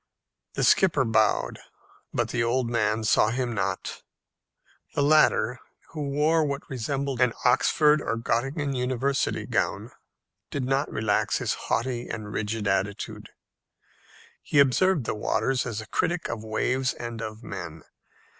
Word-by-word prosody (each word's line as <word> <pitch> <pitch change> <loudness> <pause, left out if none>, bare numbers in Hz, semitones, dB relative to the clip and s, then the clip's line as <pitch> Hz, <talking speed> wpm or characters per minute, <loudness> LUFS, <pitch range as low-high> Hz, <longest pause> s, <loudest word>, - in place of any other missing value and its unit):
The - - 0
skipper 160 -8 +4
bowed, 110 -2 +1 0.5
but - - -1
the 120 -1 0
old 120 0 0
man 110 -1 +1
saw 105 0 +4
him 120 0 -2
not. 100 -2 -3 0.9
The 145 - +2
latter, 140 -5 +4 0.3
who 150 -3 -4
wore 155 +3 +2
what 140 -1 -3
resembled 135 +1 -3
an 125 -2 +4
Oxford 150 +4 +4
or 115 - -1
Gottingen 135 +5 -1
university 130 +2 0
gown, - - -1 0.6
did 140 - -3
not 135 +2 0
relax 110 -1 +1
his - - -1
haughty 120 +1 -2
and 105 -1 -6
rigid 110 0 -2
attitude. 95 +1 -2 1.1
He - - -2
observed 140 +4 +4
the - - -1
waters 125 +4 0
as 110 -3 -3
a - - -10
critic 170 +8 -1
of 115 -2 -4
waves 130 +4 0
and 115 -1 -6
of 110 0 -6
men. 80 -7 -7
125 Hz, 135 wpm, -26 LUFS, 110-140 Hz, 1.1 s, skipper